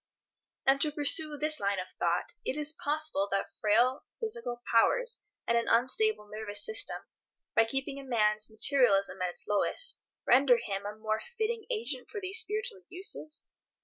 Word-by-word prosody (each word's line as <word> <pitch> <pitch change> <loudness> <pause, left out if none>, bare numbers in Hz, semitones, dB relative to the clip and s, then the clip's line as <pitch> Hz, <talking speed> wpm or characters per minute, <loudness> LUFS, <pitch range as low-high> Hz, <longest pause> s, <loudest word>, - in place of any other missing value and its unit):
And 270 +1 +3
to 305 - +5
pursue 300 +1 +4
this 305 +1 0
line 200 0 -1
of 185 0 -5
thought, - - -1
is 270 - -3
it 310 - -19
possible 295 -9 -1
that 195 0 -2
frail 235 +5 +2 0.2
physical 440 - -3
powers 475 - +2 0.3
and 235 - +1
an 235 - +1
unstable 255 - +2
nervous 205 -1 +1
system, 420 -2 -1 0.5
by 225 - +5
keeping 270 +3 -4
a - - -9
man's 215 -4 +1
materialism 220 -4 +3
at 180 - 0
its 175 - -7
lowest, 210 - 0 0.3
render 250 0 +5
him 200 -3 -4
a 210 - -7
more 215 0 -3 0.2
fitting 445 -1 -2
agent 475 +1 -4
for 425 - -6
these 385 0 -1
spiritual 425 -1 -3
uses? 355 -4 -1
265 Hz, 160 wpm, -30 LUFS, -, 0.5 s, to